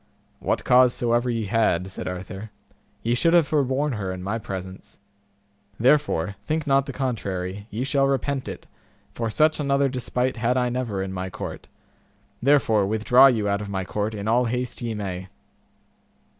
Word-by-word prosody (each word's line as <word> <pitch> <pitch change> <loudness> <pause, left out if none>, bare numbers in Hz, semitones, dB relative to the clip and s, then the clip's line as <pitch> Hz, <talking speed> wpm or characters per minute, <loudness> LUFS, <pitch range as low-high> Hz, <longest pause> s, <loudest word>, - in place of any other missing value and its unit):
What - - -1
cause 125 0 +5
soever 120 +1 +1
ye 115 -2 -1
had, 95 -3 +1
said - - -6
Arthur, 95 +3 -6 0.5
ye 120 - +1
should 165 +8 +3
have 170 -3 +5
forborne 140 0 +1
her 100 -6 -3
in 90 0 -6
my 105 +4 -2
presence; 95 -2 -8 0.8
therefore, 115 - +2
think 155 0 -1
not 135 -1 +2
the - - -3
contrary, 100 -6 -3
ye 115 +4 -3
shall 135 0 +2
repent 135 0 -1
it, - - -7 0.5
for 115 -1 -3
such 155 +8 +2
another 140 -1 +2
despite 125 0 -2
had 120 +2 +1
I 125 -1 +1
never 120 -6 -2
in 95 0 -5
my 95 0 -4
court; - - -7 0.7
therefore 120 -7 +3
withdraw 110 +5 +6
you 110 -6 +1
out 100 0 0
of 105 - -6
my 95 -2 -3
court 105 +3 -2
in 100 0 -5
all 120 +3 +3
haste 125 +1 -3
ye 115 -2 -3
may. 95 -3 -5
115 Hz, 170 wpm, -24 LUFS, 100-130 Hz, 0.8 s, withdraw